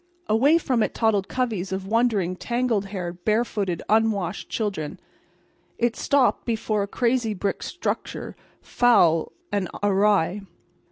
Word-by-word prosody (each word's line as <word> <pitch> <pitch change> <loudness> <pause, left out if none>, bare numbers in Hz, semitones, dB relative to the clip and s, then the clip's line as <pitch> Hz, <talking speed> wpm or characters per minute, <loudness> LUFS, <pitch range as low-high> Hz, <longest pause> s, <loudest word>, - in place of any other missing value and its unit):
Away 265 +9 +4
from 255 -8 0
it - - -1
toddled 210 -4 +1
coveys 220 -8 -2
of 190 0 -3
wondering, 210 -4 +1
tangle 240 +1 0
haired, 180 -3 -6
barefooted, 210 -5 0
unwashed 210 -4 +1
children. 195 -9 -3 0.8
It 240 0 +1
stopped 280 -3 +2
before 220 -2 -1
a 200 - -2
crazy 235 -1 0
brick 200 +1 -2
structure, 355 - -4 0.3
foul 175 -10 +3 0.2
and 200 -3 -1
awry. 200 -2 +2
210 Hz, 120 wpm, -24 LUFS, 190-235 Hz, 0.8 s, Away